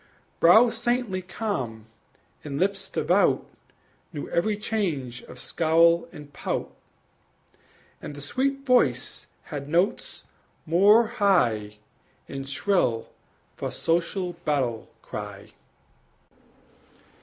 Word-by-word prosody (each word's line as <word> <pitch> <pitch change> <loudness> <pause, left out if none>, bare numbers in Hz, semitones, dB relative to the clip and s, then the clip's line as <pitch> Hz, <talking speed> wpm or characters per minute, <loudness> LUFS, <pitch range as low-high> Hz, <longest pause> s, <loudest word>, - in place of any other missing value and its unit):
Brows 225 +8 +6
saintly 240 -6 0
calm 175 - -4 0.6
and 140 -1 -4
lips 200 +2 0
devout - - +2 0.7
Knew 150 -4 -6
every 205 +5 +1
change 165 - -2
of - - -12
scowl 165 +1 +3
and 145 -1 -12
pout; - - -3 1.3
And 145 - -7
the 145 - -9
sweet 275 - -1
voice 250 -2 +2 0.2
had 145 -1 -7
notes 175 +6 0 0.4
more 200 +8 +5
high 125 - +1 0.5
And 135 0 -6
shrill 140 - 0 0.5
for - - -4
social 175 +2 -1
battle 130 -8 -1
cry. - - -8
170 Hz, 95 wpm, -26 LUFS, 140-205 Hz, 1.3 s, Brows